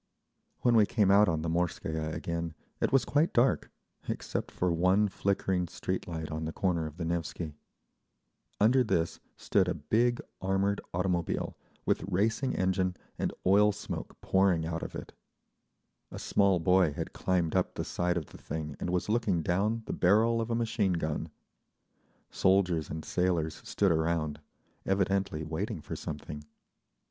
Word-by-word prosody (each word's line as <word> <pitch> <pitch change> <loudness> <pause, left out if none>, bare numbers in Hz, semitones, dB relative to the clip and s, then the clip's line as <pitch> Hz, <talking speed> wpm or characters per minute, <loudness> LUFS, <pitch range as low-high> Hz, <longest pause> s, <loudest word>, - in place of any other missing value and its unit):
When 120 -1 +4
we 105 -2 +6
came 100 -1 +3
out 105 0 +6
on 80 -2 -1
the - - -2
Morskaya 80 -2 -1
again 85 0 -3 0.2
it - - +1
was 135 -4 +4
quite 150 +4 +2
dark, 125 +2 +3 0.4
except - - -3
for 90 -1 0
one 90 +5 +3
flickering 95 -2 0
street 95 +2 -3
light 80 -2 -5
on 80 +1 -3
the 80 - -3
corner 85 -3 0
of 75 +1 -10
the 85 - -3
Nevsky. 85 -1 -3 1.1
Under 125 +5 +5
this 85 -7 0 0.2
stood 95 -3 +2
a 90 - 0
big 115 +10 +1 0.2
armored 95 +1 +1
automobile, 90 -1 -1 0.3
with - - +1
racing 110 +7 +1
engine 95 0 +1 0.2
and - - 0
oil 105 +3 +5
smoke 100 0 -6
pouring 95 -4 +3
out 80 0 -3
of - - -6
it. - - -7 1.0
A - - -8
small 100 -3 +2
boy 90 -2 +4
had - - -5
climbed 90 -3 0
up - - +1
the - - -3
side 90 0 0
of 80 - -2
the - - -14
thing 75 -1 -5
and - - -3
was 90 0 0
looking 105 -7 +1
down 105 +7 0
the - - -3
barrel 110 +5 +3
of 115 - -3
a 115 - +1
machine 110 -4 +1
gun. 80 -3 -2 1.0
Soldiers 90 -4 +2
and 80 +1 -5
sailors 85 -3 0
stood 100 -3 +1
around, 80 -2 0 0.4
evidently 95 -4 0
waiting 80 +4 -3
for 75 - -6
something. 75 0 -6
90 Hz, 155 wpm, -30 LUFS, 80-100 Hz, 1.1 s, we